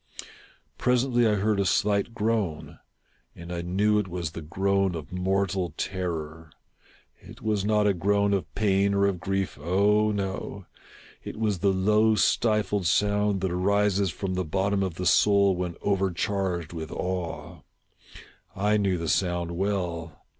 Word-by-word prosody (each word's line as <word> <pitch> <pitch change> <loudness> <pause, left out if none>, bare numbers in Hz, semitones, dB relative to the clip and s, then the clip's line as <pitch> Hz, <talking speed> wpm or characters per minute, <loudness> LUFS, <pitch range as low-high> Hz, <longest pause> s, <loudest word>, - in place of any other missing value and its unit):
Presently 125 -1 +2
I 105 - +2
heard 105 0 +1
a - - +3
slight 105 +4 +1
groan, 105 -7 -2 0.6
and 85 +1 -8
I 85 - -3
knew 100 +5 +1
it 105 - -2
was 85 -3 -4
the 80 - -7
groan 95 +3 0
of 80 -3 -7
mortal 95 -2 -1
terror. 80 -4 -4 0.7
It - - -14
was 105 -3 0
not 105 0 +2
a 100 - +3
groan 100 +2 +1
of 90 -6 -2
pain 100 -1 +2
or 100 0 +3
of 100 -3 0
grief 95 -1 -2
— - - -13
oh, 105 +6 +2
no! 100 -1 -4 0.3
— - - -22
it - - -7
was 105 -4 0
the 100 +2 +2
low 105 +3 +3
stifled 105 -4 +1
sound 105 +1 +1
that 95 -2 -1
arises 100 +1 +1
from 95 +4 -4
the 90 0 -1
bottom 95 +4 0
of 95 -4 -2
the 90 - -4
soul 100 +2 +4
when 90 -1 -3
overcharged 95 -3 -1
with 80 -2 -6
awe. 90 -2 -4 0.9
I 105 +2 +2
knew 100 -3 +1
the 85 -1 -4
sound 85 -1 0
well. 85 -4 -3
95 Hz, 155 wpm, -26 LUFS, 90-105 Hz, 0.9 s, soul